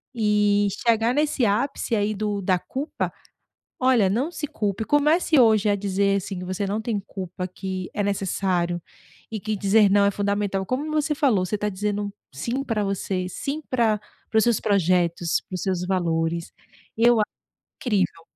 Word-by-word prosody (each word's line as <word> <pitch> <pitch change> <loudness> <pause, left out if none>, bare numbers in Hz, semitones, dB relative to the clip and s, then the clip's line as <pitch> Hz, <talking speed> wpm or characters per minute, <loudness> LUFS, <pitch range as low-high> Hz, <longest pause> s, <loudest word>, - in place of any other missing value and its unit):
E 210 -2 +3 0.2
chegar 230 +1 +3
nesse 295 -3 +1
ápice 230 +3 0
aí 210 0 0
do 205 0 -2
da 185 -1 +2
culpa, 265 - -4 0.7
olha, 255 -6 +4
não 255 - 0
se 305 -3 -4
culpe, 210 -3 -2
comece 300 +3 +3
hoje 220 -4 +5
a 205 - +3
dizer, 200 0 +1
assim, 195 -1 -4
que 180 - -6
você 185 +2 -2
não 205 +2 -1
tem 220 -2 -1
culpa, 185 -1 -5
que 185 0 -5
é - - -1
necessário 185 -3 0 0.5
e 220 - -3
que 215 +2 -2
dizer 200 +1 +4
não 200 +1 +4
é 200 - +3
fundamental. 200 -1 -1
Como 270 +8 -2
você 305 0 +1
falou, 235 -11 +2
você 210 +3 -2
tá 210 - -2
dizendo 205 +1 -2 0.2
sim 235 - -2
pra 225 -6 -1
você, 190 -2 -2
sim 280 - -4
pra 230 -4 +2 0.3
para 220 - 0
os - - +3
seus 235 -3 +2
projetos, 180 -4 +1
para 185 - -6
os 185 - -4
seus 185 -2 -1
valores, 170 -2 -1 0.5
eu 235 0 +5
acho 210 - -2 0.5
incrível 195 -8 0
205 Hz, 175 wpm, -24 LUFS, 190-230 Hz, 0.7 s, hoje